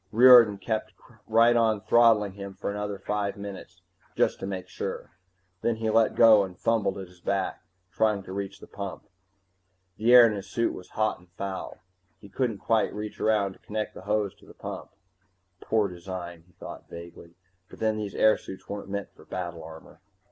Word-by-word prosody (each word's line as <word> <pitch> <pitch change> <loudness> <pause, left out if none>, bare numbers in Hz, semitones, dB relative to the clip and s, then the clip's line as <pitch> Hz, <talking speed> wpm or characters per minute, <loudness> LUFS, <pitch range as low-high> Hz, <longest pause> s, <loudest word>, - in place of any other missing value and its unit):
Riordan 120 -3 +8
kept 110 +1 -3 0.3
right 115 +2 +5
on 110 -3 +2
throttling 110 -3 +4
him 100 -1 -8
for - - -4
another 105 0 -4
five 100 +1 -2
minutes, 95 -2 -9 0.3
just - - +1
to 95 - -5
make 95 -2 -5
sure. - - -6 0.5
Then 115 - +1
he 110 0 -1
let 115 0 +3
go 110 -3 +7
and 90 -2 -8
fumbled 110 -3 0
at 95 -1 -7
his 90 0 -21
back, 100 0 -2 0.3
trying 105 -3 +1
to 95 - -8
reach 100 0 -5
the - - -11
pump. 100 -2 -7 0.9
The 115 +3 +2
air 125 -1 +10
in 110 - +2
his 100 -1 -7
suit 115 +3 0
was 90 - -10
hot 110 0 +1
and 90 0 -22
foul. 95 -1 -5 0.4
He 100 - -14
couldn't 115 +1 -1
quite 110 +2 +1
reach 105 0 -6
around 105 -3 +1
to - - -22
connect 105 0 -4
the - - -10
hose 105 0 -1
to - - -19
the - - -15
pump - - -7 0.7
Poor 110 +1 +1
design, 85 -2 -8
he 90 - -26
thought - - -10
vaguely. 85 0 -11 0.3
_But - - -13
then, 110 -1 0
these 105 -2 -5
airsuits 110 -3 +1
weren't 100 -1 -6
meant 100 0 -4
for - - -17
battle 85 -2 -5
armor. 80 0 -13
100 Hz, 185 wpm, -27 LUFS, 95-110 Hz, 0.9 s, air